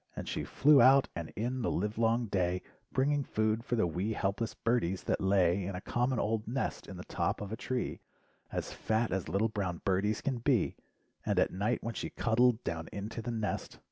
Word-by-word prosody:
And - - -6
she - - -2
flew 145 0 +5
out 135 +1 +6
and 85 -2 -4
in 125 +5 -2
the - - 0
live 105 +4 -1
long 115 +1 +2
day 90 -3 0 0.3
Bringing 140 +2 +2
food 110 -1 0
for 120 - -1
the 110 - +2
wee 90 +6 -1
helpless 105 +3 -1
birdies 95 -6 0
that - - 0
lay 95 -1 +3
In 95 +1 -4
a - - -3
common 125 +4 0
old 110 0 -1
nest 130 +3 -2
in 95 - -8
the 90 - -7
top - - -1
of 105 -1 -6
a - - -1
tree 125 +1 -3 0.5
As - - -3
fat 110 +1 0
as 95 -4 -2
little 100 +6 +1
brown 95 -5 -3
birdies 100 +3 +1
can 130 -4 -1
be, 120 -4 +2 0.5
And - - 0
at - - +3
night 105 +6 0
when 115 - -3
she - - -4
cuddled 120 +1 +2
down 80 -1 -4
into 105 +3 -5
the 115 - -5
nest. 110 -3 -3
110 Hz, 205 wpm, -32 LUFS, 95-120 Hz, 0.5 s, out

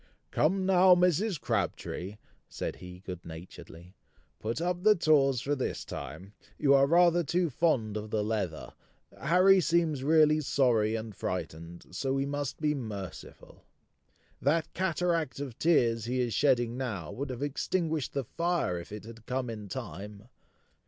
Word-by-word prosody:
"Come 185 +5 +2
now, 185 -1 +6
Mrs. 180 +1 +2
Crabtree," 100 -2 -3 0.3
said - - -5
he 90 0 -11
good 90 -2 -7
naturedly; 85 +1 -11 0.5
"put 115 +5 -3
up 175 +1 -1
the 215 +2 +6
tawse 140 - +3
for 145 - -1
this 130 - -3
time; 100 +3 -8 0.2
you 140 -1 +4
are 140 0 +5
rather 175 +2 +4
too 170 +2 0
fond 120 -8 +1
of 105 0 -4
the 105 0 0
leather. 105 -7 -3 0.5
Harry 185 +6 +5
seems 165 -5 +1
really 155 0 +4
sorry 115 -6 +2
and 110 -2 -5
frightened, 85 +1 -5
so 130 +9 -2
we 135 0 0
must 145 -1 -3
be 150 -1 +1
merciful. 105 - -8 0.8
That 155 +3 +1
cataract 175 -6 0
of 135 -5 -6
tears 115 -9 +3
he 125 +2 -1
is 120 -2 0
shedding 120 -4 +2
now, 100 -12 -4
would 140 +2 -5
have 130 +1 -4
extinguished 155 +1 -1
the 140 - -1
fire 170 - -1
if 85 - -11
it 105 0 -7
had 115 0 -12
come 125 -1 -2
in 105 -2 -7
time! 105 +4 -7
135 Hz, 150 wpm, -29 LUFS, 110-165 Hz, 0.8 s, now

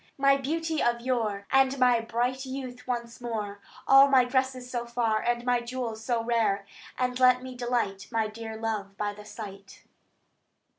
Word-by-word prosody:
My 275 0 +5
beauty 320 +3 -1
of 235 0 +1
yore; 225 -5 -1
And 270 0 +4
my 250 -2 +4
bright 245 +3 -1
youth 260 -2 -7
once 235 -1 -4
more; 210 -4 -4 0.3
All 270 +1 +8
my 265 -3 +5
dresses 260 0 -1
so 240 -1 -4
fair; 235 -2 +1
And 240 +1 -1
my 245 -1 +3
jewels 235 -2 -5
so 230 -1 0
rare; 225 -4 +1 0.3
And 250 0 -1
let 255 0 +5
me 255 -1 -7
delight 240 -5 -2
My 225 -2 +1
dear 220 +1 -7
love 210 -3 -3
by 205 0 -2
the 210 0 -12
sight." 200 -2 -10
240 Hz, 165 wpm, -28 LUFS, 220-255 Hz, 0.3 s, All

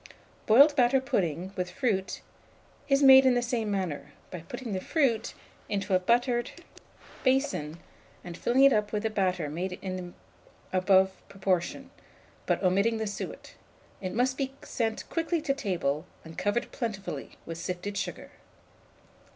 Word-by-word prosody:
Boiled 280 +7 +7
batter 260 0 +4
pudding, 185 - -2
with 180 -1 -2
fruit, 215 -9 -1 0.7
is 275 +1 +4
made 265 -1 +9
in 260 -2 +4
the 245 - +2
same 235 -3 -1
manner, 175 -8 -3 0.2
by 180 - -5
putting 220 +7 -7
the 185 - -2
fruit 250 - 0 0.3
into 200 -1 -1
a 185 - +5
buttered 240 +4 +1 0.7
basin, 260 - +1 0.5
and 175 -1 -7
filling 250 +8 +2
it 275 -1 +7
up 210 -1 0
with 210 0 -2
batter 185 -6 0
made 180 +5 -4
in 185 -1 -3
the 180 -1 -8 0.6
above 190 0 +4 0.2
proportion, 185 -3 -2 0.6
but - - 0
omitting 200 +5 +2
the 220 - -2
suet. 205 - -6 0.5
It 185 -1 -4
must 255 +3 +1
be 270 -1 -2
sent 225 -2 -2
quickly 330 0 -1
to 280 -3 +1
table, 175 - -2 0.2
and 160 0 -10
covered 205 +5 -1
plentifully 210 -5 -5
with 165 0 -6
sifted 180 +4 -4
sugar. 195 - -5
205 Hz, 145 wpm, -28 LUFS, 185-250 Hz, 0.7 s, made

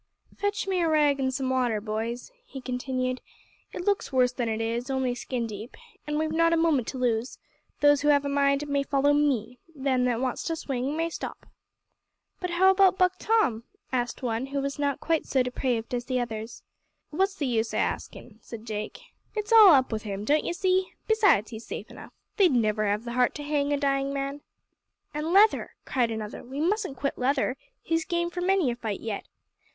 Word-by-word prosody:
"Fetch 405 0 -2
me 375 -2 +1
a 335 - +2
rag 295 -3 +3
an' 260 -1 +1
some 260 0 -2
water, 245 -4 +1
boys," 225 - -4
he 280 - -9
continued. 255 0 -3 0.5
"It 355 - -6
looks 405 -6 0
worse 250 -2 +3
than 245 -2 -2
it 220 0 -2
is 230 +3 -2
only 265 -2 0
skin 245 -1 -3
deep. 215 +1 -8 0.3
And 300 0 -1
we've 310 0 0
not 330 +1 +3
a - - +3
moment 315 -8 +2
to 265 - -4
lose. 240 -1 -1 0.4
Those 290 -1 +5
who 295 - 0
have 285 -1 +4
a - - -1
mind 280 +1 +2
may 280 -1 +1
follow 280 +1 +2
me. 265 -5 0 0.2
Them 265 -2 +1
that 240 -2 +1
wants 255 -1 -2
to 330 - -1
swing 275 -1 -3
may 330 +1 -1
stop." - - -7 0.9
"But 360 - -3
how 370 +2 +5
about 380 -1 +4
Buck 365 0 +2
Tom?" 350 - +1 0.3
asked 245 0 -2
one 235 +1 -1
who 280 +1 -2
was 275 +1 -3
not 285 -1 0
quite 325 -1 0
so 260 -2 +2
depraved 250 -2 -2
as 245 0 -2
the 255 -1 -1
others. 225 -1 -5 0.5
"What's 385 +5 +1
the 295 - -2
use 230 -3 0
o' - - -2
askin'?" 220 -2 -4
said 225 0 -10
Jake. 215 -2 -5 0.4
"It's 425 +1 -1
all 435 -3 +10
up 260 -2 +2
with 220 -1 -2
him, 205 -1 -5
don't 300 +4 +2
you - - -1
see? 370 +1 +1 0.2
Besides, 410 - +3
he's 225 0 -9
safe - - -7
enough. - - -11 0.3
They'd 370 -8 +5
never 215 -3 +1
have 205 +2 0
the 235 - -4
heart 250 0 +2
to 290 - -6
hang 290 -1 0
a 290 - +2
dying 275 -1 0
man." 275 +1 -3 0.7
"An' 300 +2 -2
Leather!" 415 +4 +4
cried 245 -3 +1
another. 220 -1 -5
"We 265 +3 -7
mustn't 370 -3 0
quit 280 +2 -2
Leather. 265 0 +1 0.3
He's 330 0 0
game 345 0 -1
for 355 - -4
many 365 -7 +2
a - - -4
fight 220 -4 -4
yet. 220 -3 -5
275 Hz, 205 wpm, -27 LUFS, 240-320 Hz, 0.9 s, all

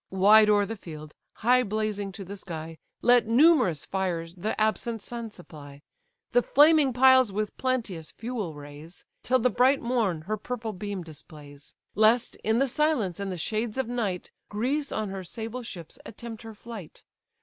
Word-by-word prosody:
Wide 210 +3 +6
o'er 205 -1 +4
the 225 - -5
field, 155 -6 -10 0.3
high 250 +1 +5
blazing 210 -2 -2
to 195 -1 -8
the 200 +3 -7
sky, 165 -4 -8 0.2
Let 245 -2 +5
numerous 235 - +4
fires 175 -3 -3
the 200 +5 -4
absent 220 0 -1
sun 235 -1 -6
supply, 145 -7 -13 0.5
The 245 - +4
flaming 295 +1 +5
piles 260 -2 +5
with 210 +1 -3
plenteous 225 -11 -2
fuel 225 -9 -5
raise, 145 +4 -12 0.2
Till 255 - +2
the 250 0 +1
bright 265 +3 +4
morn 225 -9 0
her 215 +7 -3
purple 225 0 -5
beam 200 -1 -5
displays; 150 -3 -13 0.2
Lest, 220 +3 +3
in 220 +1 0
the 275 +2 +2
silence 250 - 0
and 200 -1 -3
the 180 - -4
shades 215 +6 -2
of 265 - -1
night, 220 -7 -3 0.2
Greece 270 +7 -1
on 215 -2 -2
her 190 -1 -6
sable 225 +7 -6
ships 175 -9 -9
attempt 230 0 -9
her 225 -1 -10
flight. 215 -6 -10
215 Hz, 165 wpm, -27 LUFS, 180-240 Hz, 0.5 s, Wide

